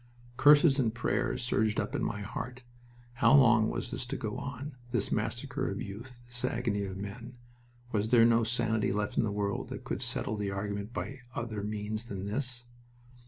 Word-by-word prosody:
Curses 145 Hz, +1 st, +6 dB
and 115 Hz, -4 st, +2 dB
prayers 120 Hz, -, 0 dB
surged 110 Hz, -3 st, +1 dB
up -, -, -2 dB
in -, -, -1 dB
my 100 Hz, -, -2 dB
heart. 125 Hz, +4 st, -6 dB, 0.5 s
How 130 Hz, +3 st, +5 dB
long 115 Hz, -5 st, +6 dB
was -, -, -3 dB
this 130 Hz, -, -3 dB
to -, -, -3 dB
go 110 Hz, -2 st, -3 dB
on 140 Hz, +1 st, -5 dB
this 120 Hz, -4 st, -1 dB
massacre 130 Hz, +5 st, -1 dB
of -, -, -4 dB
youth, 120 Hz, +3 st, -8 dB
this 120 Hz, +1 st, -4 dB
agony 115 Hz, -5 st, 0 dB
of 95 Hz, -1 st, -5 dB
men? 115 Hz, +5 st, -7 dB, 0.5 s
Was 105 Hz, 0 st, 0 dB
there 115 Hz, -1 st, +7 dB
no 115 Hz, 0 st, +5 dB
sanity 110 Hz, -2 st, +1 dB
left 105 Hz, +1 st, -1 dB
in -, -, +3 dB
the 105 Hz, -, 0 dB
world 100 Hz, -1 st, -2 dB
that -, -, -6 dB
could -, -, -3 dB
settle 110 Hz, -, -1 dB
the 105 Hz, -1 st, -1 dB
argument 100 Hz, +2 st, -3 dB
by 135 Hz, +2 st, -5 dB, 0.2 s
other 115 Hz, -3 st, -3 dB
means 105 Hz, +2 st, -3 dB
than 100 Hz, -4 st, -5 dB
this? 125 Hz, +3 st, -2 dB
115 Hz, 185 wpm, -31 LUFS, 105-125 Hz, 0.5 s, there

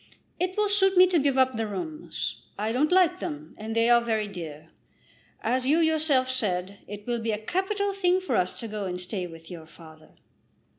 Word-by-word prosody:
It 370 Hz, +2 st, -1 dB
will 420 Hz, 0 st, +3 dB
suit 385 Hz, -2 st, +3 dB
me 365 Hz, -, +9 dB
to 360 Hz, -2 st, +2 dB
give 275 Hz, -2 st, +1 dB
up 260 Hz, -1 st, +3 dB
the 225 Hz, -1 st, -1 dB
rooms. 305 Hz, -, -5 dB, 0.2 s
I 215 Hz, +2 st, -1 dB
don't 285 Hz, +7 st, +1 dB
like 360 Hz, -2 st, +4 dB
them, 150 Hz, +1 st, -6 dB
and 220 Hz, +1 st, -6 dB
they 230 Hz, 0 st, +3 dB
are 240 Hz, 0 st, +6 dB
very 220 Hz, -3 st, -1 dB
dear. 160 Hz, -6 st, -8 dB, 0.7 s
As 255 Hz, +3 st, 0 dB
you 300 Hz, +4 st, +4 dB
yourself 315 Hz, -5 st, +3 dB
said, 200 Hz, -6 st, -2 dB
it 205 Hz, +1 st, -8 dB
will 240 Hz, -1 st, -1 dB
be 225 Hz, 0 st, -1 dB
a 210 Hz, -, -1 dB
capital 390 Hz, -, -1 dB
thing 370 Hz, -2 st, +2 dB
for 375 Hz, -, -2 dB
us 180 Hz, 0 st, 0 dB
to 230 Hz, -, -5 dB
go 210 Hz, -2 st, -4 dB
and 180 Hz, -1 st, -3 dB
stay 180 Hz, 0 st, -4 dB
with 165 Hz, 0 st, -12 dB
your 165 Hz, -3 st, -9 dB
father." 160 Hz, -1 st, -16 dB
235 Hz, 205 wpm, -27 LUFS, 195-320 Hz, 0.7 s, me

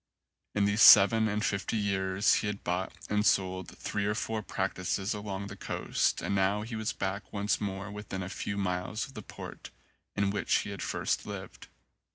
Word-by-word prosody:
In 105 Hz, -1 st, +3 dB
these 100 Hz, +2 st, +1 dB
seven 110 Hz, 0 st, +9 dB
and 105 Hz, 0 st, -1 dB
fifty 100 Hz, +3 st, -1 dB
years 95 Hz, -1 st, +2 dB
he -, -, -2 dB
had 105 Hz, -1 st, -4 dB
bought 90 Hz, +2 st, -1 dB, 0.2 s
and 105 Hz, 0 st, +1 dB
sold 95 Hz, -3 st, +1 dB
three 100 Hz, -1 st, -2 dB
or 105 Hz, -, 0 dB
four 110 Hz, 0 st, -2 dB
practices 95 Hz, 0 st, -2 dB
along 100 Hz, -2 st, -4 dB
the 100 Hz, -1 st, -7 dB
coast -, -, -1 dB
and -, -, -1 dB
now 100 Hz, +2 st, +2 dB
he 115 Hz, +1 st, -6 dB
was 110 Hz, -1 st, -1 dB
back 95 Hz, 0 st, -4 dB
once 100 Hz, 0 st, 0 dB
more 100 Hz, 0 st, -4 dB
within 105 Hz, -2 st, -5 dB
a -, -, -5 dB
few 100 Hz, +1 st, -4 dB
miles 95 Hz, +3 st, -2 dB
of 135 Hz, -, -14 dB
the 110 Hz, -, -7 dB
port -, -, -9 dB, 0.5 s
in 100 Hz, -1 st, +1 dB
which 100 Hz, -3 st, +1 dB
he -, -, -6 dB
had -, -, -6 dB
first -, -, -1 dB
lived. -, -, -8 dB
100 Hz, 190 wpm, -30 LUFS, 95-105 Hz, 0.5 s, seven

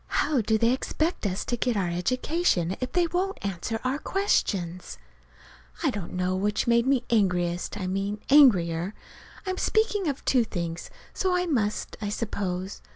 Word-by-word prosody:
How 290 Hz, -4 st, +1 dB
do 220 Hz, +1 st, +2 dB
they 230 Hz, +2 st, +3 dB
expect 310 Hz, -, -1 dB
us 185 Hz, 0 st, -3 dB
to 240 Hz, -, -1 dB
get 240 Hz, -1 st, 0 dB
our 190 Hz, -3 st, +1 dB
education 190 Hz, -, 0 dB
if 255 Hz, -, -3 dB
they 355 Hz, -1 st, +3 dB
won't 370 Hz, +3 st, -1 dB
answer 200 Hz, +4 st, -3 dB
our 260 Hz, +3 st, -1 dB
questions? 185 Hz, -, -1 dB, 0.9 s
I -, -, +3 dB
don't 200 Hz, -4 st, -6 dB
know 185 Hz, 0 st, 0 dB
which 205 Hz, +3 st, 0 dB
made 235 Hz, +1 st, +3 dB
me 265 Hz, -3 st, +3 dB
angriest 180 Hz, -3 st, +1 dB
I 185 Hz, -, -3 dB
mean 195 Hz, +3 st, -2 dB
angrier. 185 Hz, -, +5 dB, 0.5 s
(I'm 370 Hz, -1 st, -2 dB
speaking 425 Hz, -4 st, +1 dB
of 280 Hz, -2 st, -3 dB
two 255 Hz, -3 st, +4 dB
things, 170 Hz, -5 st, -5 dB, 0.2 s
so 370 Hz, -1 st, 0 dB
I 360 Hz, 0 st, +1 dB
must, 225 Hz, -11 st, -1 dB
I 205 Hz, -, -2 dB
suppose. 195 Hz, -3 st, -3 dB
215 Hz, 160 wpm, -26 LUFS, 185-280 Hz, 0.9 s, angrier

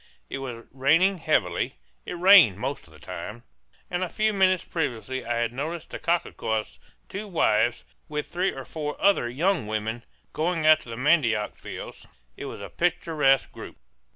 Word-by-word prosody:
It -, -, -3 dB
was 120 Hz, -4 st, -7 dB
raining 165 Hz, +9 st, +3 dB
heavily 90 Hz, -, 0 dB, 0.3 s
it -, -, -4 dB
rained 175 Hz, -, +7 dB
most 135 Hz, -2 st, -4 dB
of -, -, -19 dB
the 75 Hz, -, -15 dB
time 90 Hz, +7 st, -8 dB, 0.4 s
and 180 Hz, +1 st, -2 dB
a 180 Hz, -, -2 dB
few 215 Hz, +3 st, +1 dB
minutes 185 Hz, -2 st, +3 dB
previously 130 Hz, -4 st, -3 dB
I 120 Hz, 0 st, -2 dB
had 115 Hz, 0 st, -1 dB
noticed 155 Hz, +6 st, -5 dB
the -, -, -5 dB
cacique's 110 Hz, -, -1 dB, 0.3 s
two 205 Hz, +2 st, -6 dB
wives, 120 Hz, -, +2 dB, 0.3 s
with 150 Hz, -1 st, -3 dB
three 180 Hz, +2 st, -1 dB
or 135 Hz, -1 st, -8 dB
four 150 Hz, -2 st, -5 dB
other 195 Hz, -12 st, +3 dB
young 160 Hz, -, 0 dB
women, 110 Hz, +2 st, -3 dB, 0.3 s
going 165 Hz, 0 st, 0 dB
out 155 Hz, 0 st, +7 dB
to 125 Hz, -, -14 dB
the 115 Hz, -, -6 dB
mandioc 125 Hz, -7 st, +2 dB
fields. -, -, -9 dB, 0.3 s
It -, -, -7 dB
was -, -, -7 dB
a -, -, -7 dB
picturesque 155 Hz, -6 st, +1 dB
group. -, -, -10 dB
140 Hz, 170 wpm, -26 LUFS, 115-175 Hz, 0.4 s, rained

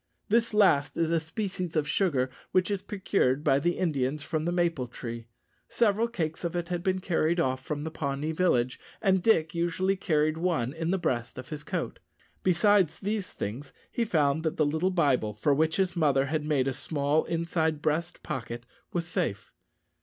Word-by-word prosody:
This 230 Hz, +2 st, +3 dB
last 145 Hz, -10 st, +3 dB
is 165 Hz, -1 st, +1 dB
a 165 Hz, -, +3 dB
species 180 Hz, 0 st, -4 dB
of 150 Hz, -2 st, +1 dB
sugar 140 Hz, -8 st, +1 dB, 0.2 s
which 185 Hz, +2 st, +3 dB
is 200 Hz, -2 st, -1 dB
procured 185 Hz, -10 st, 0 dB
by 135 Hz, -, +4 dB
the 175 Hz, +4 st, 0 dB
Indians 145 Hz, -4 st, 0 dB
from 155 Hz, -1 st, -2 dB
the 175 Hz, -, +1 dB
maple 170 Hz, -7 st, 0 dB
tree. 115 Hz, -1 st, -7 dB, 0.4 s
Several 225 Hz, 0 st, +2 dB
cakes 165 Hz, -10 st, -3 dB
of 170 Hz, 0 st, -2 dB
it 175 Hz, 0 st, -2 dB
had 175 Hz, -1 st, -1 dB
been 190 Hz, 0 st, +1 dB
carried 170 Hz, -2 st, +1 dB
off 130 Hz, -3 st, 0 dB
from 145 Hz, 0 st, -3 dB
the 160 Hz, -, -4 dB
Pawnee 140 Hz, 0 st, -2 dB
village, 130 Hz, -8 st, +1 dB, 0.2 s
and 190 Hz, -3 st, +3 dB
Dick 165 Hz, -7 st, +3 dB
usually 175 Hz, +3 st, +1 dB
carried 155 Hz, -3 st, +1 dB
one 160 Hz, -8 st, 0 dB
in 165 Hz, +1 st, -3 dB
the 190 Hz, -, +2 dB
breast 120 Hz, -8 st, -2 dB
of 130 Hz, +2 st, -8 dB
his 150 Hz, -2 st, -6 dB
coat. -, -, -3 dB, 0.4 s
Besides 185 Hz, -1 st, +3 dB
these 205 Hz, -1 st, -2 dB
things, 130 Hz, +7 st, -5 dB, 0.2 s
he 235 Hz, -, 0 dB
found 155 Hz, -7 st, +2 dB
that 160 Hz, +2 st, -2 dB
the 155 Hz, -, +3 dB
little 160 Hz, +5 st, +1 dB
Bible, 140 Hz, -, +1 dB
for 140 Hz, +7 st, +2 dB
which 160 Hz, +3 st, +2 dB
his 190 Hz, -2 st, +1 dB
mother 140 Hz, -5 st, +3 dB
had 150 Hz, +2 st, -1 dB
made 145 Hz, -3 st, +1 dB
a 135 Hz, -, 0 dB
small 145 Hz, +2 st, 0 dB
inside 165 Hz, -2 st, 0 dB
breast 155 Hz, +3 st, -1 dB
pocket, 120 Hz, -1 st, -5 dB, 0.3 s
was 170 Hz, -1 st, -1 dB
safe. 100 Hz, -, -2 dB
160 Hz, 185 wpm, -28 LUFS, 140-180 Hz, 0.4 s, by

